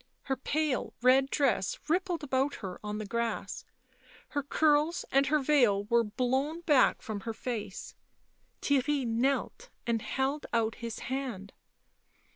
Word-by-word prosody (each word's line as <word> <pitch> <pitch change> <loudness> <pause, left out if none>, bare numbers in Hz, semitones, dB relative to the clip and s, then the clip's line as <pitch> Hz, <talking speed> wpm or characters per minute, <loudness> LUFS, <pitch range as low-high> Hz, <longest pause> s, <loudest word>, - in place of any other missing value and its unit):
Her 270 - -1
pale 290 0 -1
red 265 +2 +5
dress 270 -11 +1
rippled 355 0 0
about 270 0 0
her 185 -3 -7
on 210 0 -3
the 215 - -4
grass; 235 +2 -3 0.6
her 290 - -1
curls 300 +3 +2
and 275 0 +4
her 305 - +3
veil 255 -9 +3
were 235 +3 +3
blown 260 +8 -1
back 300 -6 +3
from 215 -2 -4
her 225 +3 -5
face; 220 -4 -5 0.7
Theirry 285 0 +2
knelt 270 - -1 0.2
and 230 -2 0
held 270 +5 -2
out 225 -1 +2
his 230 -1 -4 0.2
hand. 240 -8 -4
265 Hz, 135 wpm, -30 LUFS, 230-290 Hz, 0.7 s, red